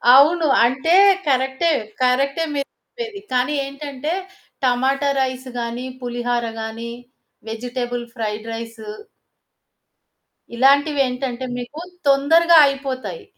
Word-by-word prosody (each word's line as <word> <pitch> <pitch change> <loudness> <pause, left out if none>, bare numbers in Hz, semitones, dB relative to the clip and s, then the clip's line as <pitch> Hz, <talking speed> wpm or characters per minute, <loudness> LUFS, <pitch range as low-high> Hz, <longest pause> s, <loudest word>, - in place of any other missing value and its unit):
అవును 315 +3 +5 0.2
అంటే 265 +8 +2 0.3
కరెక్టే 265 +4 +1 0.3
కరెక్టే 275 +5 +2
మీరు 280 0 -2
చెప్పేది. 455 -4 -7
కానీ 255 +3 +1
ఏంటంటే 280 +2 -5 0.5
టమాటా 265 +3 +2
రైస్ 260 0 -3
గాని, 235 +2 -4 0.2
పులిహర 240 0 -2 0.2
గాని 225 +1 -6 0.6
వెజిటబుల్ 245 +1 -4
ఫ్రైడ్ 215 -2 -4
రైసు... 225 -1 -8 1.7
ఇలాంటివేంటంటే 270 -1 +2
మీకు 245 +5 -7 0.3
తొందరగా 325 +5 +5
అయిపోతాయి. 260 - -3
260 Hz, 90 wpm, -20 LUFS, 240-280 Hz, 1.7 s, అవును